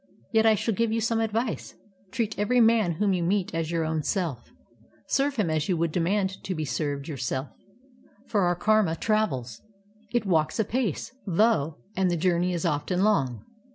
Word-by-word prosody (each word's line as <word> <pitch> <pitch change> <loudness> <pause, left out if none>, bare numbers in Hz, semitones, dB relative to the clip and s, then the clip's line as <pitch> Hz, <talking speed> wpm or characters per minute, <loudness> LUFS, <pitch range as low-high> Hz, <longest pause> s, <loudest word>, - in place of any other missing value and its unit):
Yet 225 0 +4
I 220 - +6
shall 225 +2 -1
give 230 +2 0
you 225 - +1
some 225 0 0
adxice: 225 +1 -2 0.3
Treat 225 -3 -1
ever>' 245 +5 +2
man 225 -6 +4
whom 200 +3 +1
you 180 - 0
meet 185 +2 0
as 165 -1 -2
your 165 -1 0
own 160 0 -1
self; 160 - -3 0.6
serv^e 275 +1 +1
him 205 -9 0
as 155 +3 -1
you 180 - +2
would 165 0 0
demand 190 +3 0
to 185 - -3
be 155 -1 -2
served 140 +3 -3
yourself; 130 -2 -3 0.8
for 210 -6 0
our 175 -1 +2
karma 210 -2 +2
travels; 150 - -1 0.5
it 240 -3 0
walks 160 -3 +1
apace, 220 - -1 0.2
though, 175 -5 +2 0.2
and 190 -1 +2
the 175 - 0
journey 175 +1 +1
is 175 0 -2
often 170 +4 0
long. 130 - +1
185 Hz, 180 wpm, -26 LUFS, 160-215 Hz, 0.8 s, I